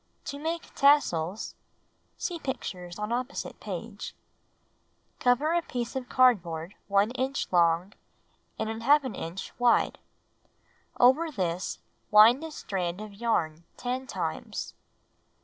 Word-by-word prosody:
To 285 -2 -5
Make 325 +2 -4
Tassels 215 - +3 0.6
(See 345 -2 -3
pictures 180 - -5
on 210 +1 -3
opposite 250 +3 -3
page) - - -6 1.1
1. 245 0 +5
Cut 310 +5 0
a 345 - +3
piece 240 -1 -3
of 255 -2 -4
cardboard 180 -9 +3
1 200 +2 +3
inch 260 +2 -1
long 175 +2 +3 0.6
and 220 - -2
^ 255 +2 +2
inch 170 +4 -6
wide. 245 -1 +3 1.0
2. - - +1
Over 285 +7 +5
this, 185 - -2 0.3
wind 225 +7 +7
a 320 - -4
strand 185 - -3
of 215 -1 -8
yarn 170 -8 -1
10 255 +1 -3
times. - - -4
230 Hz, 120 wpm, -28 LUFS, 185-265 Hz, 1.1 s, wind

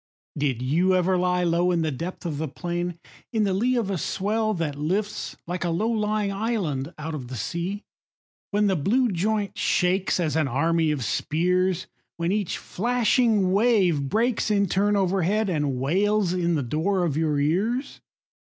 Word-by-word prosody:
Did 135 -5 -1
you 175 +8 +2
ever 185 +1 +2
lie 180 0 +1
low 175 +1 +2
In 170 -2 +1
the 155 - 0
depth 170 +7 -6
of 150 -4 -3
the 160 - -1
plain, 175 +3 -4 0.2
& - - -26
In 220 -2 +2
the 195 -2 +1
lee 245 +7 +1
of 220 -5 0
a 185 - -1
swell 215 +5 -1
that 160 -4 -2
lifts 190 +9 -2
Like 175 +1 -3
a 175 - 0
low 210 +8 0
lying 210 -2 0
island 195 - -2
out 155 +1 -5
of 135 -5 -5
the 130 - -7
sea, 170 - -3 0.7
When 210 +1 +1
the 195 -2 +2
blue 230 - +2
joint 205 +2 -1
shakes 185 -1 +1
As 160 -4 0
an 160 -3 +2
army 160 +5 +1
of 145 -4 -1
spears; 180 - 0 0.3
When 170 +1 0
each 205 -3 -1
flashing 225 -2 +1
wave 190 - +2
breaks 230 - +1
In 200 -1 +3
turn 200 +3 +1
overhead 195 +2 +1
And 145 -5 -1
wails 190 +6 +1
in 175 -2 +1
the 145 - 0
door 170 +9 0
of 150 -5 -1
your 155 -2 +1
ears 205 - -1
180 Hz, 180 wpm, -25 LUFS, 160-205 Hz, 0.7 s, In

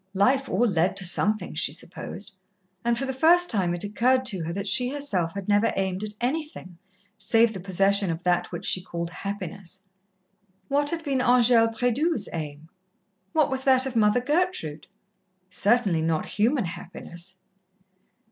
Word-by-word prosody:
Life 260 +7 +2
all 235 +6 +2
led 185 -1 +1
to 195 - 0
something, 210 +4 +1
she 150 - +2
supposed, 180 +4 -7 0.5
and 235 0 +1
for 270 - -2
the 265 - -3
first 345 +6 +4
time 180 -6 +1
it 175 - -2
occurred 250 +5 +1
to 195 -9 0
her 165 - -3
that 200 +3 -4
she 250 +4 +4
herself 205 -12 -2
had 200 -2 -6
never 205 +2 +3
aimed 190 0 -2
at 210 -1 -5
anything 250 - -4 0.4
save 225 0 +3
the 190 - -6
possession 195 +1 +2
of 165 +1 -4
that 180 0 0
which - - -6
she 185 - 0
called 170 -1 -5
happiness. 195 0 -6 0.8
What 290 +1 +2
had 330 0 -3
been 275 -4 -1
Angèle 245 -2 +5
Prédoux's 245 +1 0
aim? 155 -1 -6 0.7
what 310 -3 +2
was 265 0 -1
that 260 -1 +5
of 265 -2 -4
Mother 215 +2 +3
Gertrude? 290 - -1 0.6
Certainly 200 -5 +2
not 160 -1 -1
human 235 +2 +1
happiness. 175 +1 -8
205 Hz, 160 wpm, -25 LUFS, 180-255 Hz, 0.8 s, Angèle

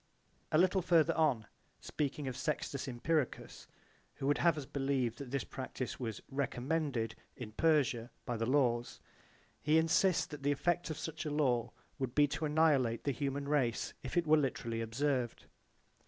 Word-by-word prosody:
B.) - - -41 0.3
A - - +6
little 185 +2 +4
further 165 -2 +4
on, 140 -9 +2 0.3
speaking 145 -1 -3
of 130 - -3
Sextus 140 -2 -2
Empiricus 135 +3 -2 0.5
who - - -5
would 145 +1 +2
have 170 -2 +3
us 145 - -4
believe 135 -4 -1
that 140 -3 -7
this 140 +1 -1
practise 130 -1 -5
was 115 -5 -4
''recommended'' 135 -3 -1 0.2
in 115 -4 -7
Persia 130 -4 +2 0.2
by 120 - -2
the 115 0 -1
laws, 125 -3 +1 0.6
he 155 +1 +3
insists 165 +3 +3
that 150 -2 -9
the 140 +1 +2
effect 175 +5 0
of 155 - -4
such 160 -1 -5
a 150 - -3
law 130 -6 +1 0.3
would 130 -2 -3
be 145 - +6
to 155 +2 -2
annihilate 145 -7 +3
the 140 - +1
human 140 +1 -2
race 135 -6 0
if 130 - -4
it 170 - +3
were 155 0 +5
literally 120 -5 -1
observed. 125 +1 -1
140 Hz, 170 wpm, -34 LUFS, 125-155 Hz, 0.6 s, A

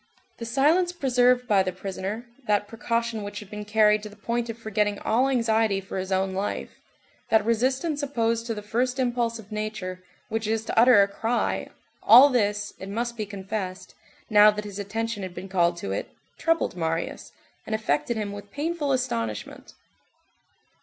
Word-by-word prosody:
The 230 - -5
silence 310 +9 +3
preserved 250 -5 +2
by 205 -4 +4
the 185 -1 -1
prisoner, 195 +4 -5 0.2
that 205 -1 +2
precaution 230 0 -2
which 205 0 -6
had 210 -2 -12
been 210 0 -6
carried 210 0 +4
to 210 - -8
the 205 - -15
point 235 +3 -2
of 230 - -5
forgetting 210 -2 -1
all 250 +7 +1
anxiety 225 -5 +2
for 195 0 -5
his 190 +1 -5
own 190 0 +1
life, 195 +2 -3 0.6
that 220 -2 +4
resistance 260 +7 0
opposed 230 -4 -1
to 225 - -2
the 210 - -7
first 245 +5 -1
impulse 240 -2 0
of 220 -1 -13
nature, 215 -4 -4 0.3
which 225 -1 -2
is 220 0 -1
to - - +1
utter 235 -4 +7
a - - +1
cry, 225 +4 -1 0.3
all 255 +5 +9
this, 205 -4 0
it 190 - -7
must 235 +3 -2
be 215 -3 -4
confessed, 195 -1 -5 0.3
now 210 -1 +7
that 210 0 -2
his 205 -1 -7
attention 220 +2 -3
had 185 -2 -6
been 185 +2 -7
called 175 -2 +2
to 95 - -5
it, 100 - -3 0.3
troubled 330 - 0
Marius, 165 -1 -3 0.4
and 220 - 0
affected 220 +2 0
him 210 -2 -3
with 205 0 -9
painful 295 +2 -1
astonishment. 115 - -3
215 Hz, 175 wpm, -25 LUFS, 200-235 Hz, 0.6 s, all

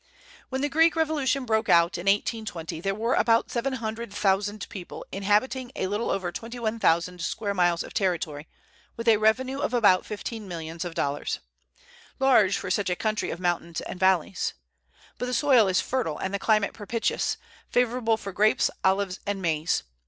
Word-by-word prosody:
When 265 0 -2
the 290 - +2
Greek 325 +4 +4
revolution 290 -4 0
broke 220 -1 0
out, 170 +1 +5
in 175 +2 -5
1820, 195 -5 -1
there 195 +1 -1
were 230 +4 0
about 230 0 +3
seven 260 +3 -1
hundred 230 -2 -4
thousand 205 +1 0
people 185 -3 -8
inhabiting 215 +6 0
a - - -1
little 205 +4 -1
over 185 -3 -1
twenty 230 +6 -7
one 230 -1 -2
thousand 170 -1 +1
square 200 +4 -2
miles 175 -3 +2
of - - -11
territory, 165 -7 -1 0.5
with 230 0 -5
a 225 -2 +6
revenue 255 +6 +1
of 285 -4 -1
about 200 -6 +5
fifteen 215 0 -6
millions 165 -1 -5
of 175 -2 -6
dollars, 145 +1 -2 0.8
large 235 -8 +4
for 185 - -4
such 195 0 +1
a 180 - +1
country 215 +2 -1
of 170 - -5
mountains 170 -2 -1
and 180 - -7
valleys. 190 -1 +1 0.6
But 250 - -2
the 250 - -1
soil 255 -7 +5
is 185 -1 +2
fertile 245 - -2
and 190 - -4
the 200 - -1
climate 215 -1 +2
propitious, 225 +2 -1 0.3
favorable 245 -2 +1
for 200 -2 -7
grapes, 215 +3 +3
olives, 190 0 +1
and 200 -1 -1
maize. 160 -3 0
205 Hz, 175 wpm, -26 LUFS, 180-235 Hz, 0.8 s, a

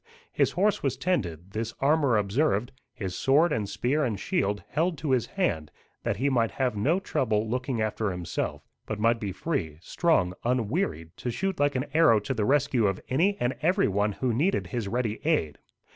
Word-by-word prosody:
His - - +1
horse 205 +3 +2
was 135 -2 -1
tended, 95 - -2
this 115 +2 -4
armour 140 -4 +3
observed, 105 +2 +1 0.2
his 95 -3 -5
sword 150 - +3
and 105 -3 -2
spear 145 +5 0
and 115 -6 -1
shield 100 +1 -1
held 165 +2 0
to 140 0 -2
his 125 -3 +2
hand, 80 - -1 0.3
that 100 - -1
he 135 +6 +1
might 120 -5 +2
have 130 -4 -1
no 145 - +2
trouble 110 - 0
looking 125 +1 -2
after 110 0 -1
himself, 90 -3 -4 0.2
but 110 - -3
might 115 +2 +3
be 100 -4 -3
free, 90 - -3
strong, 90 - +1
unwearied, 115 - -1
to 125 - -4
shoot 190 +9 -2
like 145 -1 +2
an 130 +2 0
arrow 155 -9 +5
to 105 +6 -3
the 110 -4 -1
rescue 135 -4 +2
of 95 -1 -1
any 185 +10 +2
and 120 +1 0
every 180 +5 +3
one 100 +1 +1
who 125 +3 -1
needed 165 - +1
his 120 -5 -3
ready 115 0 -2
aid. 150 - 0
120 Hz, 190 wpm, -27 LUFS, 105-145 Hz, 0.3 s, arrow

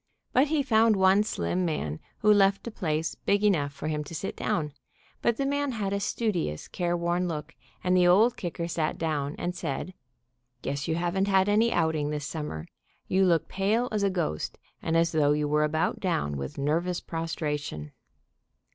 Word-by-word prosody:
But 265 +4 +4
he 300 -1 +1
found 225 -3 +4
one 190 +1 +5
slim 185 -3 -1
man 80 - -2 0.2
who 210 0 +6
left 195 -1 +3
a 235 - -4
place 160 -5 -1
big 205 +1 0
enough 160 -9 +2
for 140 +2 -6
him 150 -1 -1
to 165 - -8
sit 195 - -4
down, 150 -3 -1 0.5
but 235 -1 +2
the 275 - 0
man 285 -1 0
had 200 -3 -2
a 200 - 0
studious, 195 - -2
careworn 175 0 0
look, 150 -3 -5 0.3
and 180 0 +2
the 180 -1 +5
Old 215 +7 +5
Kicker 170 -1 -4
sat 160 -2 -1
down 150 -3 -1
and 175 +1 -2
said: 160 +4 -4 0.7
"Guess 140 0 -2
you 160 - 0
haven't 175 +3 0
had 190 -1 +4
any 220 +3 +3
outing 160 -3 +1
this 150 -1 -3
summer; 150 - -5 0.4
you 190 +1 +3
look 170 -2 +2
pale 215 +6 0
as 210 -2 0
a 200 - +3
ghost, 170 - -2 0.2
and 165 0 +1
as 165 0 +3
though 145 -2 +3
you 150 0 0
were 150 +1 +2
about 155 +1 0
down 75 - -1
with 70 -1 -5
nervous 170 +5 0
prostration." 150 - -4
175 Hz, 180 wpm, -28 LUFS, 150-200 Hz, 0.7 s, who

